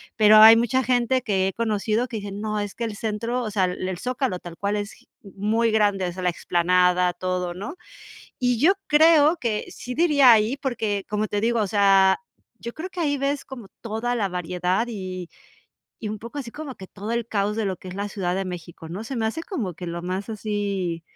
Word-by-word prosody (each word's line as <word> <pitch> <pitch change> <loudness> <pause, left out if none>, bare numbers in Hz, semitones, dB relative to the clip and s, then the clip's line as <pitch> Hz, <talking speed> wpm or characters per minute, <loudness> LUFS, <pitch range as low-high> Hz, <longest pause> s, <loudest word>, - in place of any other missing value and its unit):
Pero, 215 -1 +7
hay 220 +1 +10
mucha 240 +3 +1
gente 250 +1 +1
que 190 -5 +1
he 195 - -2
conocido 220 +1 0
que 235 -2 -5
dice: 205 -1 -6
"No, 210 +1 -3
es 205 -1 -4
que 235 - -4
el 220 -2 -3
centro", 230 +3 -2
o 220 - -3
sea, 195 -3 +2
el 185 +1 -3
el 185 - -4
Zócalo 250 -2 -2
tal 175 -1 -10
cual 200 +4 -2
es 205 0 -4
gi - - -21 0.2
muy 215 +3 0
grande, 205 -3 +2
o 175 - -2
sea, 185 +2 -7
la 180 - +3
explanada, 180 +1 +2
todo, 180 -1 -3
¿no? 200 +9 -6 0.7
Y 245 -2 +1
yo 320 +9 +6 0.2
creo 310 +1 +6
que, 230 -7 -2
sí 250 - -7
diría 290 -6 +6
ahí, 220 +3 +4
porque, 220 -7 -2
como 210 +1 -1
te 205 -1 -2
digo, 235 +1 +1
o 210 - +1
sea, 195 - +4 0.4
yo 235 0 -6
creo 350 +4 -6
que 365 -2 -5
ahí 285 -3 +1
ves 275 +1 -1
como 245 -6 -9
toda 230 +2 -2
la 205 -5 0
variedad 180 +4 -1
y 185 -5 -6 0.7
y 220 - -5
un 215 - -5
poco 235 +7 -8
así 250 -5 -6
como 295 0 -7
que 190 - -11
todo 205 +4 -6
el 235 -1 -1
caos 210 -1 -1
de 225 - -1
lo 190 -2 -2
que 185 - -10
es 180 - -7
la 200 +1 -4
Ciudad 180 -3 -2
de 195 - -1
México, 170 -2 -8
¿no? 190 +5 -5
Se 255 +4 -6
me 225 - -1
hace 225 +9 -2
como 240 - -4
que 175 +2 -8
lo 170 0 -5
más 185 +3 -4
así, 200 -5 -3
210 Hz, 225 wpm, -24 LUFS, 190-235 Hz, 0.7 s, hay